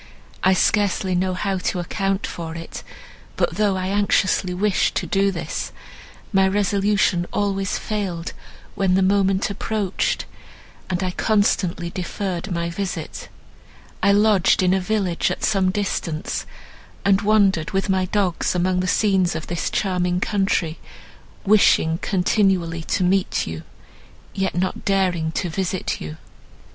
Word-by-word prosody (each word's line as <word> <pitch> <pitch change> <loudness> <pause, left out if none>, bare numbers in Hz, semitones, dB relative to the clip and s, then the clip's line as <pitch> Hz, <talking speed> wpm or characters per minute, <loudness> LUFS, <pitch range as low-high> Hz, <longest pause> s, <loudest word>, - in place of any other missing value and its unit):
I 190 - +5
scarcely 195 -2 +1
know 185 +1 0
how 195 0 -1
to 180 0 -1
account 195 +3 -1
for 165 -1 -6
it; 165 0 -7 0.6
but, - - 0
though 205 -2 +2
I 185 0 -2
anxiously 200 -2 +2
wished 195 +2 +1
to - - -1
do 200 -1 +2
this, 170 - -4 0.6
my 190 0 +4
resolution 195 -2 +1
always 195 -2 -1
failed, 190 -6 -3 0.4
when 190 -2 +1
the 190 - +3
moment 195 0 +2
approached, 205 -1 -1 0.6
and 185 0 -1
I 185 - -1
constantly 185 -4 +1
deferred 185 0 -4
my 170 -1 -1
visit. 190 +1 -5 0.7
I 200 - +4
lodged 205 -2 +4
in 180 0 +3
a 190 - +2
village 185 -3 0
at - - -4
some 195 -3 +2
distance, 185 -5 -2 0.6
and 200 -1 +4
wandered 200 -6 +3
with 195 0 -1
my 190 -1 +1
dogs, 185 -2 0
among 180 +1 +1
the 185 - -1
scenes 190 -2 +2
of 160 - -4
this 170 -1 -2
charming 180 -2 0
country, 190 -5 0 0.7
wishing 190 -5 +4
continually 185 -4 +1
to - - 0
meet 185 +1 +1
you, 80 0 -6 0.7
yet 195 -1 -1
not 185 +1 -1
daring 185 -5 +1
to 180 - -1
visit 185 +2 -2
you." 75 0 -6
190 Hz, 135 wpm, -22 LUFS, 180-200 Hz, 0.7 s, I